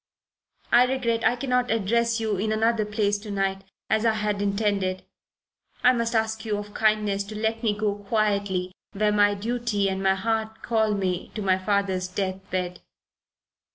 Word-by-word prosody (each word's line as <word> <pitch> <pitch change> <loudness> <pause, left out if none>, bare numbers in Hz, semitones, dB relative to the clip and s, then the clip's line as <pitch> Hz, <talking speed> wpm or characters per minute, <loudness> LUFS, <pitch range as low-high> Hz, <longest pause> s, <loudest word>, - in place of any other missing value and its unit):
I 245 - +7
regret 235 -3 0
I 245 - +3
cannot 250 -1 0
address 230 +2 +1
you 220 -3 -1
in 215 +3 -1
another 220 0 +2
place 210 -1 0
to 210 +1 -10
night, 195 -1 -1 0.2
as 220 +1 +1
I 225 -1 +3
had 210 -1 -1
intended. 200 -2 0 0.8
I 250 - +6
must 235 -1 -1
ask 220 0 0
you 215 -2 -1
of 205 - -5
your - - -18
kindness 210 -2 +2
to 215 +1 -8
let 220 +1 -1
me 215 -3 0
go 210 -1 0
quietly 200 -3 -1 0.2
where 210 +1 +1
my 205 0 +4
duty 220 -1 -1
and 190 0 -3
my 190 0 +3
heart 220 +2 -2
call 220 -2 +1
me 185 -3 -2
to 215 - -3
my 190 -1 +2
father's 190 -1 0
death 185 0 -2
bed." 180 -1 -3
210 Hz, 175 wpm, -25 LUFS, 195-225 Hz, 0.8 s, I